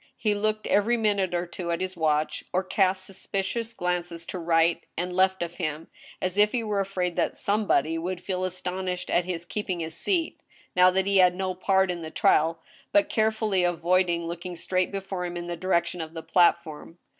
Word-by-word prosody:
He 210 -2 +1
looked 215 +1 -1
every 220 +4 +2
minute 200 -5 +1
or 175 0 0
two 175 0 -6
at 170 - 0
his 185 0 -3
watch, 155 -2 0
or 185 +1 +1
cast 185 0 +1
suspicious 195 +4 -3
glances 175 -3 -3
to 185 - -5
right 165 0 +2
and 180 +1 -2
left 190 -1 +3
of 170 0 -7
him, 155 -2 -4 0.3
as 185 +2 -1
if 210 0 +5
he 240 -2 0
were 210 -2 -1
afraid 185 -3 -1
that - - 0
somebody 200 -6 +1
would 180 +2 -3
feel 185 0 -3
aston 185 0 -3
ished 180 0 -3
at 175 - +2
his 175 -2 -4
keeping 185 -1 -3
his 160 -1 -4
seat, 340 - -1 0.4
now 180 0 +7
that 190 +1 +1
he 200 0 +2
had 180 -1 +5
no 190 0 -2
more 185 - -3
part 190 0 +2
in 175 -1 -5
the 160 - -6
trial, 160 +1 +2 0.3
but 305 0 +3
carefully 220 -6 +1
avoiding 175 0 +1
looking 175 +1 -5
straight 185 +2 -1
before 195 -2 -4
him 175 0 -4
in 175 - -5
the 175 0 -4
direc 170 0 +1
tion 170 0 -5
of 160 +1 -7
the 160 - -6
platform. 170 -2 +1
180 Hz, 205 wpm, -26 LUFS, 170-195 Hz, 0.4 s, now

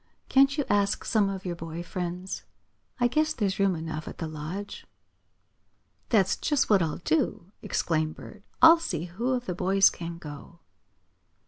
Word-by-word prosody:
Can't 275 +2 +4
you 290 - 0
ask 200 -1 +1
some 210 -3 +2
of 195 -1 -6
your 175 -1 -2
boy 165 0 -6
friends? 180 +1 -5 0.6
I 245 - +4
guess 310 +5 +1
there's 200 -7 -1
room 195 -2 +3
enough 160 -1 -5
at - - -8
the 165 - -4
Lodge." 155 +6 -7 1.2
"That's 200 -6 +3
just 295 -7 +1
what 200 -3 +5
I'll 160 -2 -1
do!" 170 +2 -1
exclaimed 155 -2 -1
Bert 210 - -12 0.2
"I'll 325 +1 +9
see 250 - -3
who 230 +9 -2
of 250 -1 -2
the 180 - -2
boys 190 +2 +4
can 170 -1 -7
go." 150 +1 -10
190 Hz, 160 wpm, -27 LUFS, 165-220 Hz, 1.2 s, I'll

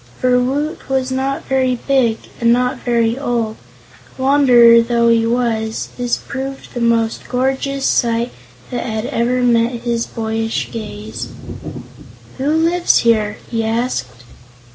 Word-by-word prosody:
For 250 -1 +3
Woot 285 +7 -2
was 265 -1 0
not 265 +1 -2
very 260 -1 +1
big 245 -3 +1 0.2
and 235 0 +3
not 250 +1 +1
very 235 0 0
old 235 -5 -1
and, - - -25
wanderer 245 -4 +6
though 235 0 +2
he 230 -1 +3
was, 230 -2 -1
this 245 -1 -1
proved 270 0 -7
the 240 - -4
most 230 -1 0
gorgeous 270 +2 -1
sight 235 0 +1 0.4
that 245 - -2
had 220 -1 -3
ever 250 +1 0
met 235 0 +2
his 235 -1 -1
boyish 225 0 -3
gaze. 215 -1 -6 1.1
"Who 275 +2 0
lives 330 +3 +3
here?" 220 -2 +2
he 225 -1 0
asked. 220 - -2
240 Hz, 135 wpm, -17 LUFS, 230-260 Hz, 1.1 s, wanderer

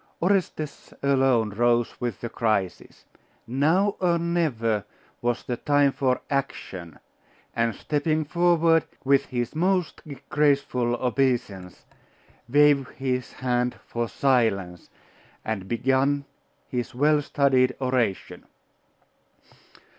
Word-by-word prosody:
Orestes 175 -5 -1
alone 130 -5 +2
rose 120 +3 +1
with 120 -1 -3
the 120 - -4
crisis. 105 -6 -2 0.4
Now, 160 - +1
or 175 -2 +2
never, 145 - 0 0.4
was 120 0 -1
the 120 - -3
time 145 +1 +3
for 130 -2 0
action; 95 - -4 0.6
and 115 -2 0
stepping 155 +1 -1
forward, 170 0 +3 0.2
with 140 0 +3
his 120 -2 -3
most 180 +1 0 0.3
graceful 140 -5 +1
obeisance, 120 -8 -1 0.6
waved 145 0 +4
his 130 -2 -2
hand 125 -1 -1
for 120 -1 -3
silence, 105 -10 0 0.6
and 100 -4 -3
began 135 +5 +1 0.4
his 120 -1 -4
well 150 +3 +3
studied 130 -3 +2
oration. 125 -7 -1
130 Hz, 100 wpm, -25 LUFS, 120-145 Hz, 0.6 s, waved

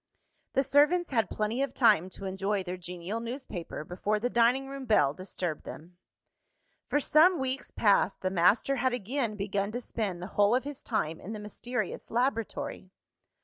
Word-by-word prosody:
The 270 - +3
servants 300 +6 +3
had 225 -7 +1
plenty 215 +4 -1
of 275 -2 -2
time 210 -8 +4
to 195 - -8
enjoy 195 +1 -1
their 180 0 -4
genial 180 +4 -5
newspaper, 230 - -6
before 185 +6 -1
the 245 +3 -1
dining 245 +3 +3
room 275 -1 -7
bell 150 - +4
disturbed 180 -3 -4
them. 175 +3 -10 0.9
For 290 - +2
some 320 +6 +5
weeks 260 -1 -2
past, 205 -2 +2
the 185 - 0
master 200 +9 +3
had 255 0 +1
again 240 0 -2
begun 200 0 -2
to 245 - -2
spend 210 -7 -3
the 180 - -5
whole 205 +3 +4
of 255 - +1
his 290 -1 -7
time 165 -8 -1
in 210 - -7
the 215 - -6
mysterious 240 +4 -4
laboratory. 230 -5 -2
215 Hz, 170 wpm, -29 LUFS, 190-260 Hz, 0.9 s, some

